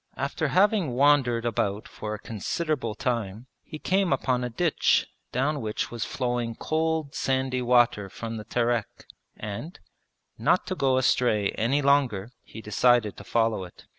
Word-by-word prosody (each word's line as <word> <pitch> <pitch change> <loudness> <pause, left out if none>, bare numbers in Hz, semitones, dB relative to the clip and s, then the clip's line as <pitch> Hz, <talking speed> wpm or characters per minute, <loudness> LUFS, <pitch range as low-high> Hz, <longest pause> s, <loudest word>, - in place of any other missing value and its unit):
After 140 +3 -1
having 185 - +2
wandered 130 -4 +3
about 105 -3 -1
for 105 0 -5
a - - -9
considerable 115 - -3
time 115 -2 -2 0.2
he 155 - -9
came 190 +2 +1
upon 130 -2 +1
a 125 - -2
ditch 160 +7 +2 0.3
down 140 +3 0
which 110 -1 -3
was 120 -2 -3
flowing 120 -2 -2
cold 160 -1 -1
sandy 130 -1 0
water 120 -4 +3
from 115 +3 -6
the 105 - -6
Terek, 120 -1 -1 0.3
and, 110 - -6 0.6
not - - +2
to 185 - -3
go 135 -5 +2
astray 120 -5 +2
any 135 +6 0
longer, 125 -7 +2
he 110 - -11
decided 115 -1 +3
to - - -9
follow 115 -4 +1
it. 90 - -13
125 Hz, 150 wpm, -26 LUFS, 110-140 Hz, 0.6 s, wandered